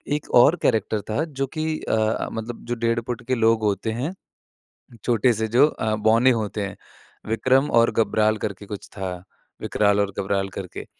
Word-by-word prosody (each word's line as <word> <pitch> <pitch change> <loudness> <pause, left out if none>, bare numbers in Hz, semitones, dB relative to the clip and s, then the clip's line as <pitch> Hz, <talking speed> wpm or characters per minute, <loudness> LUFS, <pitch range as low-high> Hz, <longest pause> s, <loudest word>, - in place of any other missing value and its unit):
एक 150 - -6
और 140 +8 +7
कैरेक्टर 110 -1 +1
था 125 +9 0
जो 135 -3 -3
कि 155 0 -1
अ, 110 0 0
मतलब 115 +1 -6
जो 120 0 -2
डेढ़ 115 0 0
फुट 120 0 -4
के 130 - +1
लोग 115 -1 +2
होते 105 +2 0
हैं, 130 +11 -3 0.9
छोटे 120 0 +3
से 110 +1 -2
जो 125 +7 +5
अ, 110 -7 -2
बौने 115 +4 +4
होते 110 -2 -2
हैं, 100 - -7 0.5
विक्रम 130 +5 +2
और 115 - +2
गबराल 110 0 +2
करके 100 0 -6
कुछ 100 0 -8
था, 95 -2 -3 0.5
विकराल 105 -1 +2
और 100 -1 +1
घबराल 95 0 -1
करके। 95 -3 -7
110 Hz, 175 wpm, -23 LUFS, 105-120 Hz, 0.9 s, और